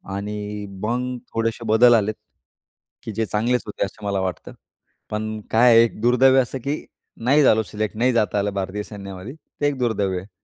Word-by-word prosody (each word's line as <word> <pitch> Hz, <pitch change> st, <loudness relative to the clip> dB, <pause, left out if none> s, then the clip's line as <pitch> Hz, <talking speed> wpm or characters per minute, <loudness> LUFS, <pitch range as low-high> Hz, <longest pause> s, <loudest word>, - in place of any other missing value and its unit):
आणि 105 Hz, 0 st, -5 dB, 0.2 s
मग 125 Hz, +2 st, -1 dB, 0.2 s
थोडेसे 115 Hz, 0 st, -2 dB
बदल 120 Hz, +3 st, +6 dB
आलेत, 110 Hz, 0 st, +1 dB, 0.9 s
की 110 Hz, -, -5 dB
जे 110 Hz, +2 st, -1 dB
चांगलेच 115 Hz, +4 st, 0 dB
होते 105 Hz, -, -2 dB
असं 105 Hz, +2 st, -10 dB
मला 100 Hz, -1 st, 0 dB
वाटतं. 95 Hz, -1 st, -4 dB, 0.6 s
पण 110 Hz, 0 st, -3 dB
काय 120 Hz, +2 st, +6 dB
आहे 115 Hz, -, +8 dB
एक 115 Hz, -, -3 dB
दुर्दैव 130 Hz, +3 st, +5 dB
असं, 130 Hz, +1 st, -4 dB
की 140 Hz, +5 st, -4 dB, 0.4 s
नाही 145 Hz, +3 st, +5 dB
झालो 110 Hz, -3 st, +4 dB
सिलेक्ट. 105 Hz, 0 st, -4 dB
नाही 125 Hz, +3 st, +2 dB
जाता 105 Hz, -3 st, +1 dB
आलं 100 Hz, 0 st, -1 dB
भारतीय 100 Hz, +1 st, -3 dB
सैन्यामध्ये. 100 Hz, +3 st, -8 dB, 0.3 s
ते 145 Hz, -, +3 dB
एक 140 Hz, -2 st, -1 dB
दुर्दैव 100 Hz, -6 st, 0 dB
आहे. 95 Hz, +3 st, -13 dB
110 Hz, 180 wpm, -22 LUFS, 105-125 Hz, 0.9 s, आहे